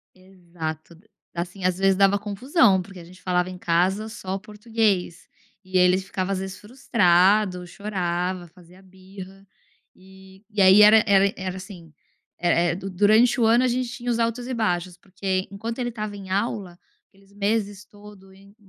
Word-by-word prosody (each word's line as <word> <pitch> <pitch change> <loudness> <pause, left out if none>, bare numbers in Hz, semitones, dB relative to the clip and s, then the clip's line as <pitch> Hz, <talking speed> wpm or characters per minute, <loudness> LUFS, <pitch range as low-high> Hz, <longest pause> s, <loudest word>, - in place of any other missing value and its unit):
Exato, 170 -4 -8 0.4
assim 180 +2 -6
às 185 0 +1
vezes 195 0 +3
dava 200 +1 +3
confusão 205 - +2
porque 195 0 -13
a - - -11
gente 180 +2 -17
falava 180 0 0
em 185 - -8
casa 185 +6 0
só 190 -4 -6
o 195 - -4
português, 210 -4 -2 0.4
e 185 0 -1
ele 180 0 +4
ficava 190 0 -4
às 195 - -1
vezes 190 0 -7
frustrado, 200 -5 +2
chorava, 180 -2 -3
fazia 180 +2 -19
birra, 190 +1 -13 0.5
e 190 +1 -18
e 210 -1 -3
aí 190 +2 +7
era 215 +1 +7
era 200 -1 +4
era 185 -1 -5
assim, 180 -5 -11 0.5
era 175 0 +2
é 170 0 +1
du 195 +2 -7
durante 215 +7 +3
o 225 - +4
ano 235 +3 +4
a 255 - +2
gente 250 +1 -1
tinha 245 0 -5
os 235 - 0
altos 230 +1 -1
e 260 - -4
baixos, 180 -6 -2
porque 190 0 -3
enquanto 225 +4 -6
ele 245 -1 -2
estava 215 -3 -6
em 195 -2 -10
aula, 195 -3 -3 0.3
aqueles 195 0 -25
meses 205 0 -2
todo 205 -2 -16
em 200 +1 -19
195 Hz, 175 wpm, -23 LUFS, 185-210 Hz, 0.5 s, aí